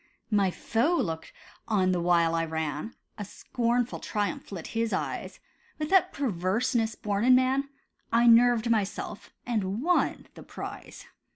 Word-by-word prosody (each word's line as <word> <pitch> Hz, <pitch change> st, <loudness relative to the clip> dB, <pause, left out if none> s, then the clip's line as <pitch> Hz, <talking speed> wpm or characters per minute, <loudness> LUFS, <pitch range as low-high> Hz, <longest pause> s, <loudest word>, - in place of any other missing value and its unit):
My 200 Hz, -3 st, +3 dB
foe 230 Hz, -, 0 dB
looked 165 Hz, -, -3 dB, 0.4 s
on 190 Hz, -4 st, +2 dB
the 180 Hz, -1 st, 0 dB
while 170 Hz, -1 st, +3 dB
I 165 Hz, 0 st, +1 dB
ran; 160 Hz, +4 st, -4 dB, 0.2 s
A -, -, -3 dB
scornful 240 Hz, +4 st, -2 dB
triumph 205 Hz, -3 st, -3 dB
lit 180 Hz, -5 st, -6 dB
his 225 Hz, -1 st, -1 dB
eyes. -, -, -4 dB, 0.4 s
With 305 Hz, +1 st, -4 dB
that 380 Hz, -3 st, +4 dB
perverseness 220 Hz, 0 st, 0 dB
born 205 Hz, 0 st, -2 dB
in 255 Hz, +1 st, +6 dB
man, 265 Hz, +2 st, +2 dB, 0.4 s
I 235 Hz, +1 st, +4 dB
nerved 235 Hz, 0 st, +5 dB
myself, 210 Hz, -1 st, -2 dB, 0.2 s
and 215 Hz, -1 st, -2 dB
won 355 Hz, +2 st, +1 dB
the -, -, -12 dB
prize. -, -, -9 dB
220 Hz, 145 wpm, -28 LUFS, 185-245 Hz, 0.4 s, in